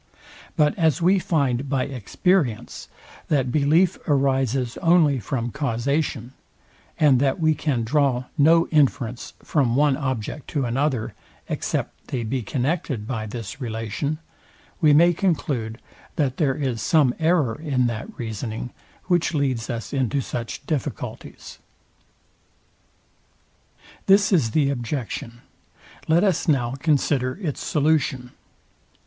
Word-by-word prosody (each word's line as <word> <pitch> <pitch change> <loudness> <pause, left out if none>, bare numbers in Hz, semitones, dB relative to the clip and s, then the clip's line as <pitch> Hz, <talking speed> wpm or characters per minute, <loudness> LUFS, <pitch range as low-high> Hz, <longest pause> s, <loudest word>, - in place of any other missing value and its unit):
But 150 -1 +3
as 160 0 +3
we 185 +3 +4
find 140 -6 0
by 135 -2 +1
experience, 140 - -1 0.4
that 135 -5 +1
belief 155 +6 +3
arises 135 -3 +1
only 165 -5 +3
from 120 0 -3
causation, 135 -1 -2 0.7
and 145 -5 +5
that 135 +3 +1
we 160 -1 +3
can 140 -6 -1
draw 130 0 +1
no 165 +2 +5
inference 130 -5 0
from 130 -6 +1
one 145 0 +3
object 130 0 -4
to 140 -4 -1
another, 130 -1 -1 0.3
except - - -3
they 125 -3 -3
be 125 +3 -2
connected 130 - -2
by 110 -3 -3
this 115 +4 -7
relation, 115 +5 -3 0.6
we 155 -2 +6
may 170 +4 +6
conclude, 140 - -1 0.4
that 135 -4 0
there 140 -5 +1
is 130 -6 -2
some 145 -2 +3
error 160 -7 +2
in 140 -4 -1
that 115 -1 -3
reasoning, 110 +1 -5 0.3
which 175 -2 +1
leads 130 -6 -1
us 115 +1 -5
into 135 0 0
such 120 -2 -5
difficulties. 150 -6 -5 2.5
This 195 +1 +5
is 145 -11 +3
the 140 +3 +2
objection; 120 -2 -4 0.7
let 165 +3 +4
us 190 -6 +1
now 130 -6 +2
consider 140 -3 +1
its 160 -9 -3
solution. 140 -5 0
135 Hz, 120 wpm, -23 LUFS, 120-155 Hz, 2.5 s, we